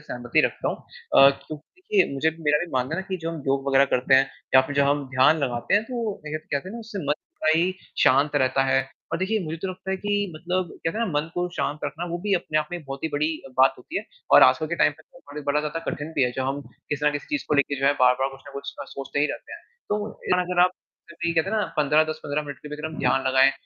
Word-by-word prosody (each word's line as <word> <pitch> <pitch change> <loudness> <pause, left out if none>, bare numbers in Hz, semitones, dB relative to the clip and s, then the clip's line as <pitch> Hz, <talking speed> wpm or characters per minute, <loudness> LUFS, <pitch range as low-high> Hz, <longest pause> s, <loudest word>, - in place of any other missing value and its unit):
सहमति - - 0
रखता - - -1
हूँ - - -2 0.4
अ, 135 0 +9
क्योंकि 150 +2 -9 0.2
देखिए 395 - +2
मुझे 140 +4 +1
भी 160 +1 -14
मेरा 150 0 +3
भी 175 - -13
मानना 130 +5 -1
है 190 - -2
कि 190 - -1
जो 165 - -2
हम 160 -4 -6
योग 135 0 0
वग़ैरह 135 0 +5
करते 130 +1 +3
हैं 135 0 +4 0.2
या 130 - +10
फिर 145 - -5
जब 140 - +5
हम 145 0 +1
ध्यान 135 +5 +5
लगाते 125 +3 -1
हैं, 205 - +4
तो 230 -4 -4
देखिए 150 +1 -3
कहते 155 +2 -4
हैं - - -8
ना - - -6
उससे 220 -2 -7
मन 145 - +2 0.3
बड़ा 155 - +4
ही 175 +3 +2 0.3
शांत 145 +1 +4
रहता 130 +1 +2
है 135 0 +3 0.3
और 165 - 0
देखिए 200 +4 0
मुझे 160 +1 -4
तो 190 - -1
लगता 185 +1 -6
है 190 - 0
कि 205 -1 -1
मतलब 175 +2 -2
कहते 165 +7 -1
हैं 230 - +1
ना, - - -3
मन 150 +2 -1
को 175 0 -1
शांत 150 +1 -2
रखना 170 +2 -4
वो 175 - -2
भी 200 - +3
अपने 155 -4 0
आप 150 - -2
में 175 - -4
बहुत 135 +2 -7
ही - - +1
बड़ी 150 +2 +1 0.3
बात 135 0 +6
होती 330 - -4
है - - -7 0.3
और - - +9
आजकल - - +5
के - - -2
टाइम - - +4
पे - - -17
तो - - -20
बड़े 150 - -6
बड़ा 150 +1 +2
ज़्यादा 150 +2 -3
कठिन 150 +2 -6
भी 145 - +1
है, 125 - +2
जो 130 +1 -2
हम 135 +2 -2 0.3
किसी 150 0 -2
ना - - +5
किसी 145 - -5
चीज़ 295 -2 -1
को 150 - +2
लेके 140 -1 +1
जो 135 - +2
है 140 - +5
बार-बार 125 +1 +4
कुछ 135 0 -13
ना - - -12
कुछ 140 0 -6
गलत - - -7
सोचते 135 +1 -5
ही 150 - +4
रहते - - -7
हैं, - - -8 0.3
तो 210 +1 -1 0.3
अगर 180 0 0
आप 180 - +5 0.4
सिर्फ़ 170 0 -5
यही 170 - +1
कहते 165 +4 +1
हैं 220 - 0
ना, 210 - +1
15-10-15 150 0 +1
मिनट 145 -2 -8
के 150 - -10
भी 150 - -5
अगर 150 +1 -4
हम 155 -1 -7
ध्यान 135 0 +2
लगाएँ 130 +1 +5
150 Hz, 280 wpm, -24 LUFS, 140-175 Hz, 0.4 s, या